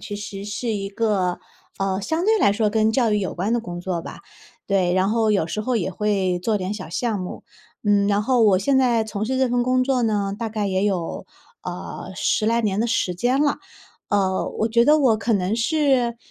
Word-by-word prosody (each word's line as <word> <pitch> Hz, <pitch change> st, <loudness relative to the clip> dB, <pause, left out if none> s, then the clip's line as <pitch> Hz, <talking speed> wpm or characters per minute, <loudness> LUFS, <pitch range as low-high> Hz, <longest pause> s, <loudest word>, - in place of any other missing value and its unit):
其 205 Hz, -, -6 dB
实 200 Hz, -1 st, -7 dB
是 210 Hz, +4 st, -4 dB
一 195 Hz, -2 st, -3 dB
个， 200 Hz, -4 st, 0 dB, 0.4 s
呃， 195 Hz, 0 st, -1 dB
相 320 Hz, -, -1 dB
对 440 Hz, +2 st, +3 dB
来 350 Hz, -, +4 dB
说 215 Hz, +1 st, +1 dB
跟 220 Hz, 0 st, +2 dB
教 235 Hz, -1 st, +2 dB
育 210 Hz, -, +2 dB
有 190 Hz, -, -3 dB
关 195 Hz, +6 st, -1 dB
的 240 Hz, -, +1 dB
工 175 Hz, -5 st, -7 dB
作 175 Hz, -2 st, -3 dB
吧， -, -, -9 dB, 0.5 s
对， 190 Hz, -3 st, +1 dB
然 185 Hz, +1 st, +2 dB
后 220 Hz, -1 st, +2 dB
有 195 Hz, -6 st, +1 dB
时 190 Hz, +6 st, -3 dB
候 250 Hz, +1 st, 0 dB
也 190 Hz, -3 st, -1 dB
会 190 Hz, -2 st, 0 dB
做 210 Hz, +3 st, 0 dB
点 190 Hz, +2 st, -3 dB
小 185 Hz, -6 st, -7 dB
项 220 Hz, +3 st, -1 dB
目。 185 Hz, -1 st, -7 dB, 0.4 s
嗯， 205 Hz, -1 st, +3 dB
然 205 Hz, 0 st, +2 dB
后 245 Hz, +1 st, +2 dB
我 200 Hz, -4 st, +5 dB
现 270 Hz, +8 st, +1 dB
在 240 Hz, -4 st, +3 dB
从 215 Hz, -1 st, -4 dB
事 260 Hz, +3 st, -1 dB
这 260 Hz, -1 st, +2 dB
份 245 Hz, 0 st, +1 dB
工 255 Hz, +1 st, +2 dB
作 260 Hz, -2 st, +1 dB
呢， 205 Hz, -3 st, 0 dB
大 230 Hz, -, -2 dB
概 210 Hz, -1 st, -2 dB
也 190 Hz, -1 st, 0 dB
有， 185 Hz, -5 st, -2 dB, 0.4 s
呃， -, -, -7 dB
10 215 Hz, -, +1 dB
来 230 Hz, +1 st, +2 dB
年 205 Hz, -3 st, -1 dB
的 230 Hz, -, +1 dB
时 220 Hz, -6 st, 0 dB
间 245 Hz, +9 st, +1 dB
了。 290 Hz, -1 st, +1 dB, 0.5 s
呃， 190 Hz, -2 st, +1 dB
我 220 Hz, -, +2 dB
觉 235 Hz, +1 st, +3 dB
得 305 Hz, +1 st, +6 dB
我 255 Hz, -7 st, +3 dB
可 220 Hz, +2 st, 0 dB
能 195 Hz, +2 st, 0 dB
是， 255 Hz, -2 st, +1 dB
210 Hz, 235 characters per minute, -22 LUFS, 195-235 Hz, 0.5 s, 得